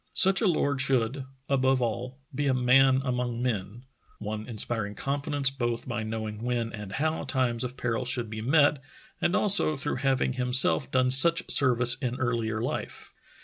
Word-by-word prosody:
Such 190 -1 +6
a 215 - +2
lord 145 -5 0
should, 130 0 0 0.2
above 135 -1 +1
all, 120 +2 -4 0.2
be 145 +1 -2
a 130 - +1
man 130 +1 +3
among 125 -2 -3
men 115 -2 -4 0.2
— - - -41
one 110 0 -6
inspiring 110 -2 -1
confidence 140 +1 -1
both 120 -3 -4
by 120 -2 -3
knowing 110 -1 -5
when 120 -1 -3
and 105 -3 -8
how 155 +5 -2
times 125 -4 -1
of 125 +1 -6
peril 120 0 -2
should 120 -1 -3
be 110 0 -7
met 145 +3 +2 0.4
and 175 - +1
also 200 -7 +3
through 135 - -4
having 135 -1 0
himself 130 +2 +4
done 130 -1 +1
such 165 +6 +4
service 125 -3 +4
in 125 -2 -2
earlier 115 -4 -2
life. 120 - -6
125 Hz, 170 wpm, -26 LUFS, 115-135 Hz, 0.4 s, Such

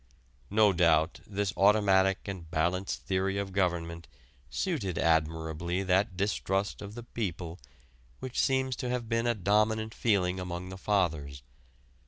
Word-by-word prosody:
No 105 -1 +4
doubt 80 -2 +3
this 100 -1 -2
automatic 95 -2 +3
and 90 -5 -6
balanced 85 +4 -1
theory 95 +1 0
of 100 -1 -3
government 85 -3 -1 0.4
suited 105 - -2
admirably 80 +2 0
that 95 +1 +1
distrust 100 0 -1
of 100 +1 -8
the 120 - -7
people 90 -7 -4 0.6
which 130 -1 -4
seems 130 -1 +1
to 125 - -3
have 120 -2 -2
been 115 +1 0
a 120 - +2
dominant 110 +3 +1
feeling 95 -5 +1
among 90 0 -5
the 95 - -7
Fathers. 80 -10 -1
95 Hz, 135 wpm, -30 LUFS, 85-105 Hz, 0.6 s, No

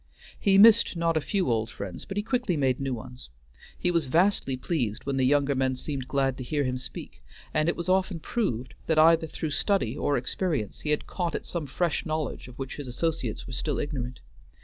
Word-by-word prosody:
He 195 -1 +4
missed 225 -1 +7
not 165 0 +1
a 155 - +2
few 185 - 0
old 110 -1 0
friends, 95 -5 -7
but 195 - -6
he 205 - +1
quickly 245 - 0
made 130 -3 +1
new 135 -2 -1
ones. 125 - -10 0.5
He 180 - +1
was 165 -5 +1
vastly 165 -3 +2
pleased 125 - -2
when 140 -1 -1
the 130 - +3
younger 145 0 +3
men 130 -1 +1
seemed 135 -1 -4
glad 135 -2 0
to - - -4
hear 145 +3 0
him 130 -1 -1
speak, 65 - -9 0.3
and 155 +1 +2
it - - 0
was 170 - -5
often 185 -1 +1
proved 130 - -2
that 160 - +2
either 160 +1 +6
through 155 0 -4
study 140 - +1
or 145 -1 +1
experience 135 - -2
he 150 - -4
had 150 - +1
caught 175 -3 -2
at - - -4
some 165 -4 -3
fresh 170 +4 0
knowledge 155 -5 -3
of 125 - -12
which 135 -1 -5
his 145 -3 -6
associates 130 -2 -2
were 125 - -8
still 145 +3 -2
ignorant. 130 -4 -4
145 Hz, 215 wpm, -27 LUFS, 130-170 Hz, 0.5 s, missed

